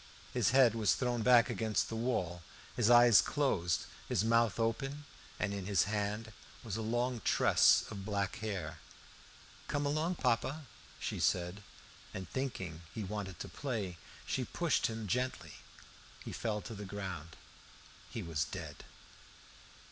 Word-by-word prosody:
His - - +3
head 130 -3 +6
was 110 -3 +2
thrown 125 -2 0
back 120 0 +6
against 110 -2 0
the 115 - -5
wall, 95 -8 -1 0.3
his 120 -2 +3
eyes 120 -3 +8
closed, 95 - 0 0.2
his - - +2
mouth 115 0 +3
open, 135 +6 -1 0.3
and 100 -1 0
in 100 -2 -4
his 100 -5 +3
hand 105 +2 -2 0.3
was 110 -5 -4
a 110 - -2
long 120 +2 -1
tress - - +5
of 100 -2 -6
black 100 -2 -1
hair. 100 -8 -4 0.9
"Come 145 0 -1
along, 155 +5 0
papa," 140 +3 0 0.3
she - - -3
said. 90 +3 +1 0.5
And 95 -1 -5
thinking 95 -8 -4
he 110 - -4
wanted 95 -3 -5
to - - -5
play; 110 - -4 0.3
she - - -1
pushed - - +1
him 110 -1 -5
gently. 110 - -2 0.7
He - - -5
fell 105 -2 -2
to 115 - -7
the 105 -1 -7
ground. 95 -5 -6 0.7
He 110 - -5
was 80 -3 -1
dead. - - -7
110 Hz, 145 wpm, -34 LUFS, 95-120 Hz, 0.9 s, eyes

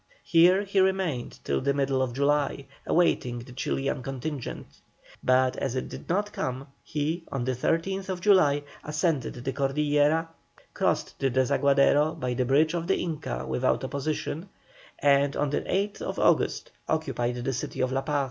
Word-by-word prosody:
Here 180 +4 +5
he 200 -1 0
remained 190 -9 0
till - - 0
the 140 +1 +1
middle 135 -1 +1
of 130 -2 -1
July, 140 0 +1 0.2
awaiting 125 -8 +2
the 120 +2 -9
Chilian 135 +1 -2
contingent; 135 +1 -6 0.4
but 130 0 +3
as 130 -2 -2
it 130 - -3
did - - -9
not 205 +4 0
come 130 +1 -3 0.2
he, 155 +3 -2
on 135 -3 -2
the 130 - +1
13th 185 +8 -1
July, 175 -8 +4 0.2
ascended 150 -2 -1
the 125 +2 -4
Cordillera, 150 +3 +2 0.5
crossed - - -1
the 135 - +2
Desaguadero 140 +4 +3
by 125 -2 -1
the 125 +1 0
bridge 150 +5 +3
of 170 -1 -2
the 195 - +2
Inca 145 - -3
without 65 - 0
opposition, 145 +6 -3 0.5
and 140 0 +3
on 145 -1 0
the - - 0
8th 200 +2 -2
August - - +2 0.2
occupied 130 -6 -1
the 125 +2 -2
city 130 - -5
of 130 0 +1
La 135 +1 0
Paz. 150 0 0
140 Hz, 155 wpm, -27 LUFS, 130-165 Hz, 0.5 s, Here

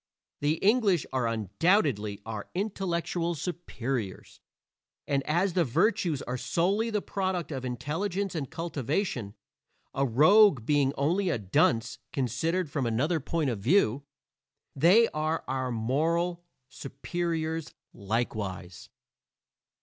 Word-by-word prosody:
The 145 +1 +2
English, 205 - +3
are 130 -3 +1
undoubtedly 110 - +1
our 110 -2 -6
intellectual 175 -3 -1
superiors; 135 - -4 0.7
and 140 -1 +1
as 175 +4 +1
the 175 - +3
virtues 165 - +1
are 125 +1 -4
solely 185 - +1
the 210 -2 -1
product 185 -4 -2
of 135 -3 -4
intelligence 175 +10 -2
and 150 -6 -3
cultivation 155 - -3 0.6
a 135 - 0
rogue 150 - +5
being 145 -1 +3
only 175 +7 +1
a 165 - +1
dunce 110 +3 +1
considered 155 - -1
from 140 -3 -2
another 145 +9 +1
point 150 -1 -1
of 110 - -4
view 135 - +3 0.7
they 180 - +6
are 155 +1 -2
our 130 -1 -2
moral 165 +9 0 0.2
superiors 160 +4 -4 0.2
likewise. 100 -4 -4
150 Hz, 110 wpm, -28 LUFS, 125-175 Hz, 0.7 s, they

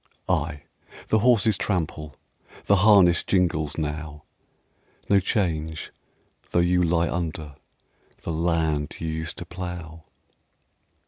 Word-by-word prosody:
Ay, 75 -4 -1 0.5
the 110 - +3
horses 110 -3 +3
trample, 80 -7 -2 0.5
The 100 - +4
harness 95 -4 +5
jingles 80 -5 0
now; 75 -1 -4 0.9
No 100 - +5
change 80 -5 -2 0.6
though - - -1
you 90 +1 +3
lie 85 0 +2
under 80 -4 -4 0.7
The - - -4
land 80 -3 0
you 80 - -4
used 80 0 -4
to 85 - -6
plough. 85 -2 -7
85 Hz, 110 wpm, -25 LUFS, 80-90 Hz, 0.9 s, harness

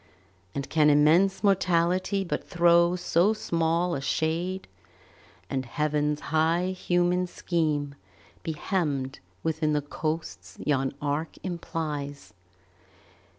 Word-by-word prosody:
And 140 -1 -3
can 155 -2 +4
immense 160 +8 +4
Mortality 185 0 +2
but 180 - -4
throw 170 0 +4
So 180 +3 +2
small 170 -2 0
a 140 - -2
shade, 170 +6 -1 0.8
and 130 -1 -2
Heaven's 150 +3 -1
high 165 +3 +2
human 180 0 +1
scheme 155 -5 -1 0.5
Be 160 - -3
hemmed 150 -6 -2 0.2
within 160 -1 0
the 150 - +1
coasts 145 - -4
yon 135 -2 +1
arc 145 +3 -2
implies? 150 -5 -4
160 Hz, 105 wpm, -27 LUFS, 150-175 Hz, 0.8 s, can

